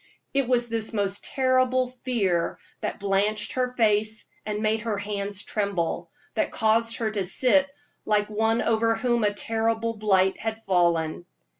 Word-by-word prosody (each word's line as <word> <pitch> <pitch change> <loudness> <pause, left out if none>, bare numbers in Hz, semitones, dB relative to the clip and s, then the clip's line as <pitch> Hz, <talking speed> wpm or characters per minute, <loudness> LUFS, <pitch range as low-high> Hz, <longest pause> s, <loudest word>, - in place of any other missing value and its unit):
It 275 -2 +1
was 245 -1 +2
this 225 -1 -1
most 200 -1 -1
terrible 255 -1 +2
fear 230 -9 -1 0.2
that - - -4
blanched 200 +2 +1
her 255 -1 0
face 215 -2 +2 0.2
and 210 0 -2
made 215 0 +1
her 220 -2 -2
hands 205 0 -3
tremble, 200 -5 -2 0.2
that - - 0
caused 225 +1 +1
her 220 -2 -1
to 205 -2 -1
sit 270 +9 +3 0.3
like 210 -1 +1
one 220 +2 +1
over 225 0 +2
whom 240 -2 0
a 205 - +3
terrible 225 +2 -1
blight 190 -3 +2
had 225 0 -4
fallen. 170 -2 +1
220 Hz, 150 wpm, -25 LUFS, 200-230 Hz, 0.3 s, sit